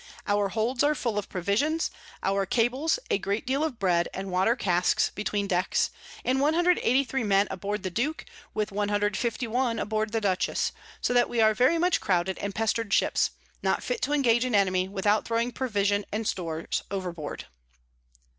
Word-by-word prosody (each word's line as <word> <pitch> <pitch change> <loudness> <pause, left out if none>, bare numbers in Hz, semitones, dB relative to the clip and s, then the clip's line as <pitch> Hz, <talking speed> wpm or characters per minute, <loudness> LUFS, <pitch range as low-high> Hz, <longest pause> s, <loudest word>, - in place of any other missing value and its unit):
Our 205 -1 +1
Holds 230 +5 0
are 300 +1 +3
full 235 -6 -1
of 205 - -7
Provisions; 215 - 0 0.3
our 195 0 +1
Cables, 255 - +1
a - - +2
great 200 +4 -2
deal 270 +4 0
of 305 -7 -2
Bread, 175 -4 +1
and 190 0 -5
Water 190 +6 +3
Casks 180 -6 +1
between 205 0 -2
Decks; 185 -1 +1 0.3
and 260 +1 +2
183 280 -5 +2
Men 200 -1 +3
aboard 205 +3 -3
the 185 - -3
Duke, 275 - -2 0.3
with 215 0 -1
151 220 +4 0
aboard 215 0 -1
the 225 - 0
Dutchess: 190 -4 0 0.3
so - - +1
that 245 0 +3
we 235 - -1
are 220 -1 +5
very 255 +9 +3
much 355 +2 +2
crouded 185 -1 0
and 200 -1 -4
pester'd 225 -1 0
Ships, - - +2 0.3
not - - 0
fit - - -2
to 290 - -1
engage 240 -5 +3
an 250 -3 0
Enemy 185 -2 +2
without 205 +2 +1
throwing 235 +1 0
Provision 205 -5 0
and 215 +1 -2
Stores 165 -3 -2
overboard. 175 -6 -5
215 Hz, 165 wpm, -27 LUFS, 195-245 Hz, 0.3 s, are